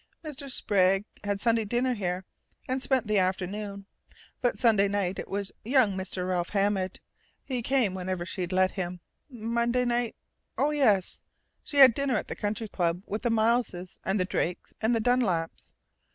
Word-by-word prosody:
Mr. 290 -2 -6
Sprague 195 -4 +2 0.2
had 200 -1 -1
Sunday 230 +1 +2
dinner 245 +4 0
here, 185 -4 -3 0.4
and 255 +1 -1
spent 260 -2 +1
the 210 -1 +2
afternoon, 195 +2 -2 0.6
but 245 - +1
Sunday 215 -5 +4
night 195 -2 -1
it - - -5
was 200 0 -3
young 240 -4 +3
Mr. 185 -1 -3
Ralph 180 -1 -1
Hammond. 195 -2 0 0.4
He 255 -3 -2
come 240 -5 +1
whenever 185 -1 -3
she'd 180 -1 -4
let 185 0 +3
him.... 180 -2 -4 0.3
Monday 235 +1 0
night?... 240 -1 0 0.4
Oh, 295 - +2
yes! 215 -11 +2 0.4
She 290 - -5
had 265 -3 +9
dinner 275 0 0
at - - -4
the - - -4
Country 215 +1 -3
Club 175 -2 -1
with 210 +2 -3
the 240 - 0
Mileses 220 -5 0
and 195 +2 0
the 185 - +2
Drakes 180 -1 -2
and 225 +2 +2
the 225 - +1
Dunlaps. 215 -9 0
205 Hz, 165 wpm, -28 LUFS, 185-240 Hz, 0.6 s, had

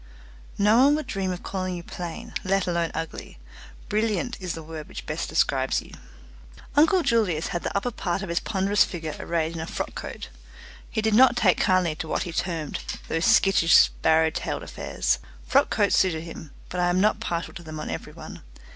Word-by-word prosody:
"No 210 +3 +4
one 290 +1 +5
would 310 - -3
dream 195 -7 -2
of 180 - -6
calling 185 -1 -3
you 175 - -7
plain, 170 -1 -7
let 195 0 +1
alone 170 -2 0
ugly; 165 - -6 0.5
brilliant 220 +4 0
is 180 -2 -3
the 165 - -8
word 155 -1 -8
which - - -8
best - - -3
describes - - +1
you." - - -12 0.8
Uncle 325 +5 +5
Julius 205 - +1
had 175 -3 -2
the - - -2
upper 245 +5 -1
part 185 -3 -2
of 190 - -6
his 170 - +1
ponderous 200 0 +2
figure 160 -4 -5
arrayed 165 -1 -1
in 165 - -5
a 160 - -5
frock - - -4
coat. - - -7 0.6
He 220 - -2
did 220 -1 +2
not 255 +2 +6
take 200 -7 +3
kindly 185 -4 +2
to 160 - -5
what - - -1
he 175 - -5
termed 165 -4 -2 0.3
"those 165 +1 0
skittish 170 -5 +5
sparrow 160 0 +4
tailed - - -3
affairs". - - -1 0.3
Frock 275 +2 +3
coats 205 -2 +2
suited 165 -4 +1
him, 165 -2 -9 0.2
but 180 - -4
I 175 0 +2
am 175 +1 +2
not 210 +2 +3
partial 170 0 -3
to 175 - -9
them 155 -2 -8
on - - -4
every - - -6
one. - - -10
180 Hz, 200 wpm, -25 LUFS, 165-210 Hz, 0.8 s, not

